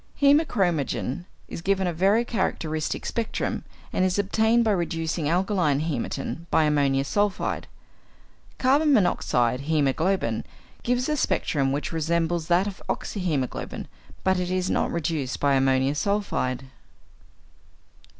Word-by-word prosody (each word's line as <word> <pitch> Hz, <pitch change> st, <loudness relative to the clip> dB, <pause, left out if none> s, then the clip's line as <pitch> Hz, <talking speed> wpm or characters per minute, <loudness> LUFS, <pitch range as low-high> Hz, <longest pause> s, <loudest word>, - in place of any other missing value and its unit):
Hæmochromogen 185 Hz, -, +2 dB, 0.2 s
gives 190 Hz, +3 st, -1 dB
a 180 Hz, -2 st, 0 dB
very 200 Hz, +8 st, +3 dB
characteristic 160 Hz, -8 st, -2 dB
spectrum, 230 Hz, -2 st, -2 dB, 0.3 s
and -, -, +1 dB
is 185 Hz, 0 st, +1 dB
obtained 220 Hz, +4 st, +3 dB
by 220 Hz, -, +2 dB
reducing 165 Hz, -4 st, -1 dB
alkaline 175 Hz, -5 st, +1 dB
hæmatin 160 Hz, +2 st, -3 dB
by 160 Hz, -, +3 dB
ammonium 140 Hz, -3 st, +2 dB
sulphide. 205 Hz, +7 st, -1 dB, 0.9 s
Carbon 285 Hz, +4 st, +3 dB
monoxide 125 Hz, -, +2 dB
hæmoglobin 160 Hz, +5 st, +1 dB, 0.4 s
gives 245 Hz, +1 st, 0 dB
a 305 Hz, -, +1 dB
spectrum 140 Hz, -, 0 dB
which 145 Hz, +2 st, -2 dB
resembles 165 Hz, 0 st, 0 dB
that 175 Hz, +2 st, +3 dB
of 200 Hz, -2 st, -6 dB
oxyhæmoglobin, 160 Hz, -, -2 dB, 0.4 s
but 190 Hz, -1 st, +2 dB
it 180 Hz, -1 st, -2 dB
is 185 Hz, 0 st, 0 dB
not -, -, +1 dB
reduced 155 Hz, -6 st, -2 dB
by 140 Hz, -1 st, +3 dB
ammonium 135 Hz, 0 st, +3 dB
sulphide. 150 Hz, -8 st, -1 dB
170 Hz, 115 wpm, -25 LUFS, 145-200 Hz, 0.9 s, very